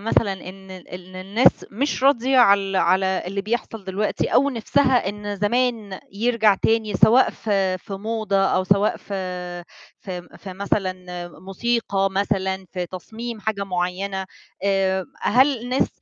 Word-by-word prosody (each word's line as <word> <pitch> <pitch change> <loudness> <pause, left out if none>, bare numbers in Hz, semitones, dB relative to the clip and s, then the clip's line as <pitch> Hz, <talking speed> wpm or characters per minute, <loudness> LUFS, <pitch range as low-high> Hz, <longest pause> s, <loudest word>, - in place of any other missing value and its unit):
مثلًا 210 -1 +1
إن 190 0 -10
ال 185 -2 -10
إن 185 +1 -10
الناس 200 +7 +3
مش 260 +5 -2
راضية 265 -1 +4
على 200 -5 +7
ال 195 -1 -3
على 190 0 +2
اللي 195 +2 -2
بيحصل 220 0 -3
دلوقتي، 195 +3 -1
أو 280 +2 +3
نِفسها 250 -1 +2
إن 205 0 -5
زمان 215 -1 0
يرجع 220 0 +3
تاني 220 +1 0
سواء 225 +5 +5
في 195 -3 0
في 195 - -11
موضة، 215 0 -2
أو 195 -1 +2
سواء 200 +2 +2
في 180 -3 -5 0.3
في 180 -3 -6
م 175 - -17
في 190 - -9
مثلًا 195 0 -1 0.5
موسيقى 195 0 0
مثلًا، 190 -1 -1
في 180 -1 -3
تصميم 220 +6 -7
حاجة 205 -1 -2
مُعيّنة، 190 +1 -2 0.4
آآ 190 -1 +1 0.2
هل 260 +2 +3
الناس 250 +2 +1
200 Hz, 145 wpm, -22 LUFS, 190-225 Hz, 0.5 s, على